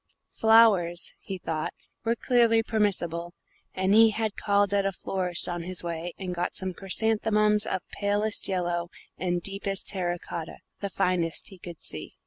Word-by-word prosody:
Flowers, 215 -7 +4
he 195 - -6
thought, 160 -3 -3 0.3
were 230 +1 +1
clearly 235 -2 +3
permissible, 175 -6 0 0.4
and 190 +1 +2
he 225 +1 +7
had 220 -1 -2
called 200 -1 +1
at 200 -1 +3
a 195 - 0
florist's 180 -1 -2
on 175 -1 -3
his 180 +1 -2
way 170 0 -4
and 185 -2 -4
got 175 0 -2
some 185 -1 -2
chrysanthemums 210 +2 +2
of 190 - -3
palest 205 +1 +1
yellow 175 -2 -1 0.3
and 175 -1 -1
deepest 195 0 -2
terra 180 -3 -1
cotta, 165 -1 -7 0.2
the 200 - -3
finest 180 -4 0
he 190 - -14
could 170 -2 -9
see. 80 -1 -6
190 Hz, 155 wpm, -27 LUFS, 175-210 Hz, 0.4 s, he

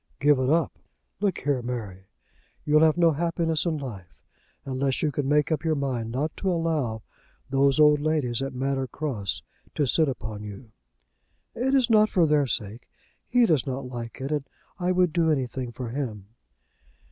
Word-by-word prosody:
"Give 145 -1 +4
it 130 0 +1
up! 165 +2 +1 0.4
Look 200 -2 0
here, 140 -2 0
Mary; 105 -6 -6 0.6
you'll 150 +1 +4
have 160 0 +4
no 170 -1 +5
happiness 165 +1 0
in 160 -2 0
life 105 -11 -9 0.4
unless 135 0 -1
you 150 - +2
can 140 -1 -2
make 150 +1 +2
up 155 -1 0
your 160 -1 +1
mind 130 -5 -2
not 145 +6 -2
to 195 - -1
allow 155 -10 -1 0.5
those 140 +1 +3
old 150 -1 +6
ladies 145 -6 0
at 135 -1 -4
Manor 135 0 -1
Cross 120 -10 -3 0.3
to 145 - +2
sit 155 +3 +3
upon 110 -5 -5
you." 105 +3 -9 0.8
"It 265 +3 +1
is 260 -3 +4
not 215 -1 +5
for 175 -3 +3
their 150 -2 +3
sake. 115 0 -3 0.4
He 245 -1 +4
does 155 - +2
not 135 0 -3
like 120 -2 -7
it, 135 +2 -4
and 145 -2 -2 0.3
I 180 0 +1
would 180 -3 +2
do 165 -1 +2
anything 130 -4 -1
for 120 0 -6
him." 115 -7 -5
140 Hz, 175 wpm, -26 LUFS, 125-160 Hz, 0.8 s, old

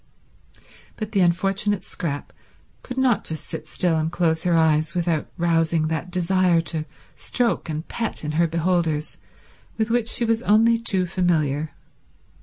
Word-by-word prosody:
But 215 - -5
the 200 - +1
unfortunate 195 +3 +1
Scrap 145 -4 -5 0.5
could 255 - -8
not 260 -4 +2
just 160 -1 -4
sit 155 - -7
still 165 0 +1
and 160 +1 -1
close 165 -1 0
her 175 -1 +3
eyes 160 +1 +2
without 170 -3 0
rousing 165 -2 +1
that 160 +3 -3
desire 180 -1 +2
to 155 -1 -2 0.3
stroke 240 -8 -1
and 155 +1 -4
pet 225 -7 -3
in 150 - -2
her 165 +2 +2
beholders 165 -2 0 0.6
with 220 0 0
which 235 -1 +1
she 235 - 0
was 225 0 +1
only 230 +1 +4
too 195 -5 0
familiar. 160 -5 0
175 Hz, 150 wpm, -23 LUFS, 160-205 Hz, 0.6 s, only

